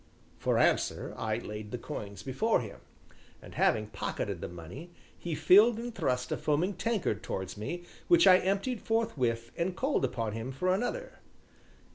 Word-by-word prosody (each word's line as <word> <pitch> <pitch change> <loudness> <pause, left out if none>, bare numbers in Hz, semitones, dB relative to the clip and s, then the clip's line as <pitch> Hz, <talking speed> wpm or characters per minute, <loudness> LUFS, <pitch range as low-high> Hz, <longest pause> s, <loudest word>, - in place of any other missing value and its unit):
For - - +1
answer - - +1
I - - -1
laid 105 0 -6
the 125 - -4
coins 105 -6 -7
before 135 - +1
him. 110 -4 -8 0.6
And - - -12
having 110 -1 +2
pocketed 105 - -4
the - - -3
money, 90 - -9 0.3
he 170 -3 -4
filled 205 +9 +6
and 235 +1 -5
thrust 125 - -1
a - - 0
foaming 160 +7 +1
tankard 190 - -1
towards 95 -5 -4
me, 170 +12 -5 0.2
which 345 -1 +6
I 185 0 +8
emptied 200 +6 -1
forthwith 125 - 0
and 175 +2 -1
called 270 +2 +1
upon 115 -2 -1
him 115 +4 -4
for 180 +8 +1
another. 375 - -3
155 Hz, 160 wpm, -30 LUFS, -, 0.6 s, I